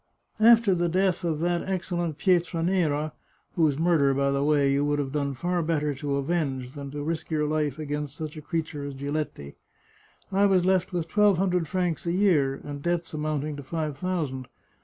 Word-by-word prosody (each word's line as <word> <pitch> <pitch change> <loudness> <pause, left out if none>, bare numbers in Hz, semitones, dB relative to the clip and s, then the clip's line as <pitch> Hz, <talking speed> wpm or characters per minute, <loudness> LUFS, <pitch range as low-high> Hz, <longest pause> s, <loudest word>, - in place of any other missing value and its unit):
After 225 -2 +6
the 175 -1 +1
death 185 +1 +1
of 160 -3 -1
that 175 0 +1
excellent 175 -4 -2
Pietra 175 -3 +1
nera 155 -5 0 0.4
(whose 155 -5 +2
murder, 155 -5 +3
by 140 0 +1
the 140 0 0
way, 145 -2 +3
you 140 +1 +2
would 145 0 +1
have 140 -2 -2
done 140 -1 -1
far 175 +5 -1
better 150 -2 0
to 140 0 -3
avenge, 135 -4 -2
than 140 -2 -7
to 145 +1 -5
risk 165 +1 -3
your 155 -2 0
life 150 -2 -1
against 145 -2 -4
such 155 -1 -5
a 155 - -7
creature 155 -2 -3
as 140 -1 -5
Giletti), 140 - -4 0.8
I 200 +1 +4
was 185 -2 +3
left 185 -1 +2
with 175 -3 -2
twelve 205 +1 +4
hundred 180 -3 +1
francs 175 -3 -1
a - - +2
year, 165 -9 +3
and 145 -1 -6
debts 170 +1 -1
amounting 150 -1 -2
to 145 - -7
five 155 +1 -3
thousand. 145 -6 -3
155 Hz, 190 wpm, -26 LUFS, 145-175 Hz, 0.8 s, After